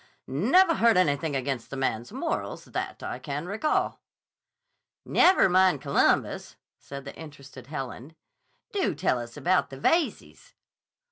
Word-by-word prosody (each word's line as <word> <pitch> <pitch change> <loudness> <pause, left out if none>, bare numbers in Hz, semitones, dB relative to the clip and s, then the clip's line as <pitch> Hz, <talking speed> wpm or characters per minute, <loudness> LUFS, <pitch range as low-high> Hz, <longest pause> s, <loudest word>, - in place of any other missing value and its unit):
Nevah 300 - +3
heard 230 -4 +4
anything 145 -3 +1
against 135 -2 -3
the 135 - -6
man's 120 -3 -2
morals, - - -4
that - - -5
I - - -5
can 145 +3 -5
recall." 215 +11 -1 1.1
"Never 375 - +5
mind 185 -4 +4
Columbus," - - +1 0.2
said 140 0 -9
the 140 - -8
interested 140 -5 -12
Helen. 135 0 -7 0.6
"Do 395 -2 0
tell 125 - 0
us 120 0 -8
about 185 +1 +1
the 135 - -9
Veyzes." 325 - -1
145 Hz, 130 wpm, -27 LUFS, 135-190 Hz, 1.1 s, Never